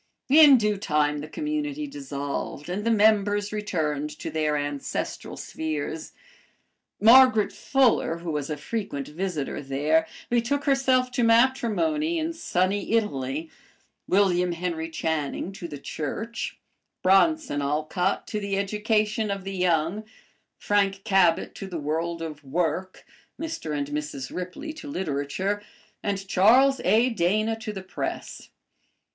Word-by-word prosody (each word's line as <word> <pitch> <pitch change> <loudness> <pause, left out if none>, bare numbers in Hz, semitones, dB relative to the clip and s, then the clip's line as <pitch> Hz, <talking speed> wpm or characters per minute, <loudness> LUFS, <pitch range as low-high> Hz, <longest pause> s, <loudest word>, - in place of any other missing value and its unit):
In 295 -2 +9
due 210 -2 +1
time 150 -5 +1
the 150 - -6
community 300 - -3
dissolved 165 - -5
and 195 +4 -2
the 230 - +1
members 205 -2 +3
returned 155 -8 -2
to - - -5
their 155 -1 0
ancestral 145 -1 -4
spheres. 155 0 -4 0.9
Margaret 235 -2 +7
Fuller, 255 -10 +2
who 170 -1 -5
was 150 -1 -3
a 150 - -3
frequent 170 -6 -4
visitor 160 -3 -3
there, 150 +4 +1 0.2
betook 240 +4 0
herself 260 -2 +2
to 245 0 0
matrimony 265 +7 +2
in 325 +1 -1
sunny 195 - -1
Italy, 155 - -1 0.6
William 180 -2 +3
Henry 165 -1 -3
Channing 160 +1 -2
to 195 -3 -7
the 145 - -7
Church, 215 +12 -5 0.5
Bronson 195 - +3
Alcott 155 +6 -1
to 215 - -3
the 200 -1 -2
education 210 +1 0
of 200 -1 -3
the 195 0 -5
young, 180 +2 +1 0.5
Frank 195 -1 +1
Cabot 190 -6 +3
to 195 - -7
the 180 -3 -5
world 165 +3 -2
of 150 -2 -7
work, 175 +6 -2 0.3
Mr. 315 - -4
and 140 0 -3
Mrs. 145 -2 -5
Ripley 180 - -5
to 310 -1 -10
literature, 185 - -2 0.4
and 195 -1 -3
Charles 255 +9 +5
A. 225 +7 +4
Dana 215 +3 +1
to 220 -1 -5
the 190 -2 -7
press. 190 - -5
195 Hz, 130 wpm, -26 LUFS, 155-230 Hz, 0.9 s, In